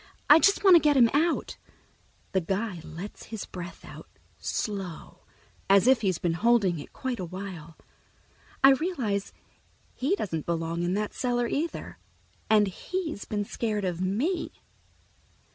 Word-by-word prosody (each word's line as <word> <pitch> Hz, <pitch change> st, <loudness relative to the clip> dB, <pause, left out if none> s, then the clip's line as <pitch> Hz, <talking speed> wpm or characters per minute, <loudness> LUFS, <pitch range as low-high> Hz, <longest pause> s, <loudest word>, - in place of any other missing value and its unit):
I 305 Hz, -, +10 dB
just 395 Hz, +4 st, +3 dB
want 380 Hz, -3 st, +8 dB
to -, -, +9 dB
get 295 Hz, -2 st, +3 dB
him 235 Hz, -3 st, +6 dB
out." 320 Hz, +3 st, 0 dB, 0.7 s
The 190 Hz, -, +1 dB
guy 190 Hz, +1 st, -3 dB
lets 175 Hz, +7 st, -9 dB
his 220 Hz, -2 st, -6 dB
breath 175 Hz, -1 st, -9 dB
out, -, -, -11 dB, 0.3 s
slow, 195 Hz, -6 st, -5 dB, 0.4 s
as 195 Hz, +1 st, +6 dB
if 260 Hz, -2 st, +5 dB
he's 190 Hz, -5 st, +1 dB
been 170 Hz, -2 st, -1 dB
holding 200 Hz, -3 st, +2 dB
it 145 Hz, -, -10 dB
quite 260 Hz, -3 st, -4 dB
a -, -, -3 dB
while. 175 Hz, -3 st, -8 dB, 0.9 s
I 270 Hz, -, +9 dB
realize 265 Hz, -, -1 dB, 0.6 s
he 285 Hz, +10 st, 0 dB
doesn't 165 Hz, -, -4 dB
belong 165 Hz, 0 st, -2 dB
in 175 Hz, +2 st, 0 dB
that 210 Hz, 0 st, -2 dB
cellar 245 Hz, -1 st, 0 dB
either, 320 Hz, +7 st, -4 dB, 0.5 s
and 215 Hz, -1 st, +5 dB
he's 315 Hz, -, -4 dB
been 205 Hz, -1 st, -2 dB
scared 210 Hz, -2 st, -2 dB
of 180 Hz, -1 st, -2 dB
me. 250 Hz, -, -1 dB
210 Hz, 145 wpm, -27 LUFS, 180-265 Hz, 0.9 s, I